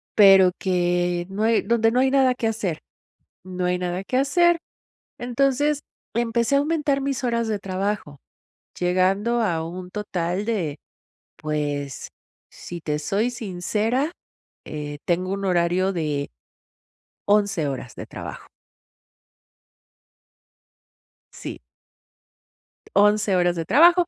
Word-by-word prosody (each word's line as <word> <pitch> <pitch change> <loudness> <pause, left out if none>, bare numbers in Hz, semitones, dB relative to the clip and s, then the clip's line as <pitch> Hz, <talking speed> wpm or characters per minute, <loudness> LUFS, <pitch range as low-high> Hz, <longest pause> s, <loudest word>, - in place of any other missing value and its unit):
pero 195 -3 +7
que 175 -1 0
no 205 +3 -2
hay 225 0 +3
donde 225 +1 +2
no 250 - +2
hay 265 - +3
nada 265 -2 +4
que 230 - -1
hacer 200 -7 -2 0.6
no 185 -1 -4
hay 180 0 +1
nada 180 +1 -2
que 255 - -1
hacer, 345 +5 +3 0.6
entonces 275 +4 +1 0.3
empecé 235 +2 +1
a - - +6
aumentar 295 -2 0
mis 270 -1 -2
horas 235 -1 0
de 210 -2 -1
trabajo, 190 -6 -3 0.6
llegando 190 +6 +1
a 165 -6 0
un 180 +2 -7
total 185 -2 -2
de, 180 -10 -2 0.6
pues, 145 -2 -3 0.4
si 175 -1 -8
te 150 -1 -2
soy 205 +10 0
sincera, 225 - -1 0.5
eh, 145 -1 -6
tengo 180 +2 0
un 200 0 -3
horario 180 +1 +2
de 150 -4 -2 0.9
11 200 -7 +2
horas 130 -2 -6
de - - -7
trabajo. - - -9 2.8
Sí. - - -7 1.3
11 205 -1 +4
horas 175 -1 +2
de 165 -1 -3
trabajo. 345 - +6
195 Hz, 115 wpm, -23 LUFS, 175-235 Hz, 2.8 s, pero